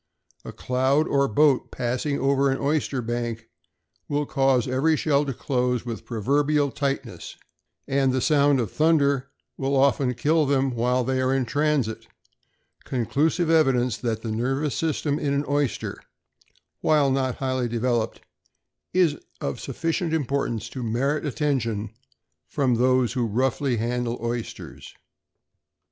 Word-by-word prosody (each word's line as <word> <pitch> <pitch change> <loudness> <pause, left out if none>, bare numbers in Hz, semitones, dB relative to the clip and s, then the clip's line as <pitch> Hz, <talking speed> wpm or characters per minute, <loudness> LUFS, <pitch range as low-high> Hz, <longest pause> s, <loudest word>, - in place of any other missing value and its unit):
A - - -7
cloud 130 +4 +1
or 140 0 +2
a - - -3
boat 140 +4 +3
passing 130 +4 -2
over 140 0 +2
an 135 - 0
oyster 140 -3 -1
bank 115 -1 -4 0.6
will 145 0 0
cause 135 -3 +2
every 135 +5 +2
shell 145 -1 +1
to - - -1
close 125 -2 -1
with 115 -2 -6
proverbial 140 +5 +1
tightness, 140 -1 -4 0.5
and 135 -1 +2
the 130 - 0
sound 145 -1 +3
of 115 - -2
thunder 140 -4 +2 0.3
will 135 +1 -1
often 135 -2 +2
kill 155 +3 +2
them 135 -1 +2
while 125 +1 +1
they 130 +1 0
are 130 0 +1
in 135 -2 0
transit, 145 -3 0 0.8
conclusive 155 - 0
evidence 130 -7 +3
that 115 -2 -3
the 115 - -3
nervous 135 +5 -1
system 155 -2 -1
in 140 -1 0
an 140 +1 0
oyster, 145 -2 -1 0.8
while 145 -3 +3
not 130 -2 0
highly 130 -2 -1
developed, 120 -1 -1 0.7
is 170 -5 +3 0.2
of - - -3
sufficient 165 0 -2
importance 135 -7 -1
to 130 - -6
merit 135 +7 -1
attention 115 -7 -1 0.6
from 130 - +1
those 125 +1 +2
who 125 -3 0
roughly 130 +3 0
handle 120 +1 -2
oysters. 110 - -6
135 Hz, 135 wpm, -24 LUFS, 120-145 Hz, 0.8 s, boat